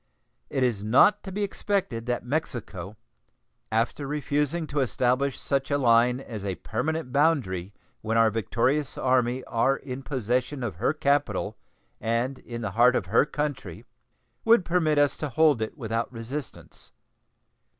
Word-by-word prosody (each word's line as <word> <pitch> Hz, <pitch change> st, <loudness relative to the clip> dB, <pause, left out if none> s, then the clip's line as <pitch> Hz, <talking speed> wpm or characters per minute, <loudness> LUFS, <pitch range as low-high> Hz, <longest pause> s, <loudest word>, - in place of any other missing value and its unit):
It 130 Hz, -, 0 dB
is 115 Hz, -5 st, 0 dB
not 140 Hz, -, +5 dB
to 190 Hz, -, -6 dB
be 205 Hz, +2 st, -2 dB
expected 195 Hz, -, -2 dB
that 120 Hz, -1 st, -2 dB
Mexico, 115 Hz, -, -4 dB, 0.7 s
after 115 Hz, +5 st, 0 dB
refusing 150 Hz, +3 st, -1 dB
to 145 Hz, -1 st, -3 dB
establish 130 Hz, +1 st, +1 dB
such 135 Hz, -1 st, -1 dB
a 145 Hz, -, +2 dB
line 125 Hz, -1 st, +4 dB
as 110 Hz, -6 st, -7 dB
a 95 Hz, -2 st, -2 dB
permanent 160 Hz, -, -3 dB
boundary 125 Hz, -, +1 dB, 0.3 s
when 115 Hz, +1 st, -1 dB
our 115 Hz, -1 st, +5 dB
victorious 125 Hz, +7 st, 0 dB
Army 125 Hz, 0 st, +1 dB
are 130 Hz, +4 st, +1 dB
in 130 Hz, -1 st, -7 dB
possession 130 Hz, +1 st, -2 dB
of 105 Hz, -9 st, -4 dB
her -, -, +1 dB
capital 145 Hz, -1 st, 0 dB, 0.4 s
and 115 Hz, +4 st, -1 dB
in 120 Hz, -1 st, -7 dB
the 105 Hz, -, -2 dB
heart 120 Hz, +4 st, +5 dB
of -, -, 0 dB
her 115 Hz, +9 st, +3 dB
country, 145 Hz, -, -4 dB, 0.6 s
would 225 Hz, -4 st, +5 dB
permit 160 Hz, -4 st, +2 dB
us 145 Hz, -1 st, +3 dB
to 150 Hz, -, -3 dB
hold 145 Hz, -2 st, +3 dB
it 110 Hz, +7 st, -4 dB
without 115 Hz, -2 st, -2 dB
resistance. 125 Hz, +3 st, -7 dB
130 Hz, 150 wpm, -26 LUFS, 115-145 Hz, 0.7 s, not